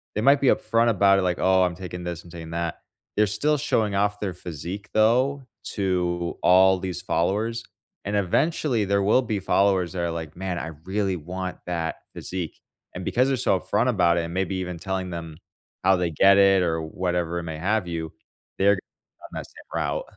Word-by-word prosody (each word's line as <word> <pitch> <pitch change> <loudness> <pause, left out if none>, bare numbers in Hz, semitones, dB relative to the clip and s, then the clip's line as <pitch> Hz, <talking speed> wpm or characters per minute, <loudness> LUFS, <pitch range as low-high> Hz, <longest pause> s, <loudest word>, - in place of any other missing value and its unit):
they 105 - 0
might 140 +4 +5
be 140 - +3
upfront 115 -1 +3
about 100 -2 +4
it, - - +1
like, 90 -1 0
"Oh, 95 0 +4
I'm 90 -1 0
taking 90 0 -7
this, 85 -1 -5
I'm 85 - -14
taking 85 -2 -8
that." 85 0 -3 0.3
They're 105 0 +3
still 145 +10 +1
showing 110 -7 0
off 105 +1 +1
their 100 -3 -3
physique, 90 +4 -7
though, 130 +6 +3 0.3
to 90 -3 -1
all 95 +1 +5
these 90 -1 -4
followers. 105 +6 0 0.4
And, 100 +1 -2
eventually, 120 - +1
there 100 0 +1
will 105 +6 +4
be 110 -5 -2
followers 95 -2 +2
that 90 - -4
are 85 -1 -1
like, 80 -2 -6
"Man, 95 -1 -3
I 80 - -4
really 95 +1 -1
want 90 +3 -5
that 85 -2 -2 0.2
physique." 90 -3 -5 0.3
And 90 0 -6
because 125 +2 +2
they're 135 - +1
so 95 - +2
upfront 110 +7 0
about 90 -7 +3
it 85 - +1
and 85 - -7
maybe 95 0 -1
even 90 -2 -4
telling 95 0 -3
them, 80 -2 -6 0.5
how 95 0 +6
they 90 -1 0
get 100 +5 +5
it 95 -1 +5
or 80 -2 0
whatever 85 0 -2
it - - -6
may 80 -2 -5
have 100 +3 0
you, 80 -2 -4 0.5
they're 100 +1 +4
g - - -6 0.4
down - - -10
that - - -5
same - - -15
route. - - -1
95 Hz, 200 wpm, -25 LUFS, 85-105 Hz, 0.5 s, how